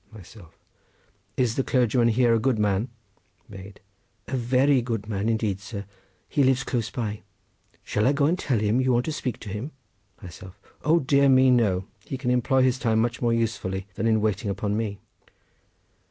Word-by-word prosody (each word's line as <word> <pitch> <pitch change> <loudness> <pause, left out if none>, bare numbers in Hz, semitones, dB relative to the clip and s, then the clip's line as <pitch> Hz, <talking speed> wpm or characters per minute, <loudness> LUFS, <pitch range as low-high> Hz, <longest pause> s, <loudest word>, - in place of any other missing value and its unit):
Myself.—Is 105 +3 -8
the 135 - +2
clergyman 120 -2 +2
here 120 +1 +3
a 115 - +3
good 125 0 +1
man? 105 +2 0 0.6
Maid.—A 100 +4 -11
very 130 +2 +2
good 115 -3 -4
man 105 0 -2
indeed, 110 -4 -1
sir. 100 0 -7 0.4
He 145 - 0
lives 130 0 +2
close 120 -4 -2
by. 105 -3 -4 0.6
Shall 105 +3 0
I - - +4
go 140 0 +1
and 175 +5 +1
tell 130 -9 0
him 105 +4 +1
you 130 -1 +2
want 120 +1 +1
to 160 - -2
speak 125 -6 -4
to 105 - -8
him? 105 +10 -5 0.5
Myself.—O 95 - -3
dear 140 +1 +3
me, 130 0 +5
no! 100 -7 +2 0.2
He 135 - -5
can 125 -2 -1
employ 130 +2 +2
his 130 0 +1
time 115 -3 +1
much 115 +1 0
more 120 -1 +2
usefully 105 -5 -2
than 115 - -2
in 110 -1 +2
waiting 105 0 -1
upon 100 +1 -2
me. 105 -2 -3
115 Hz, 170 wpm, -25 LUFS, 105-130 Hz, 0.6 s, me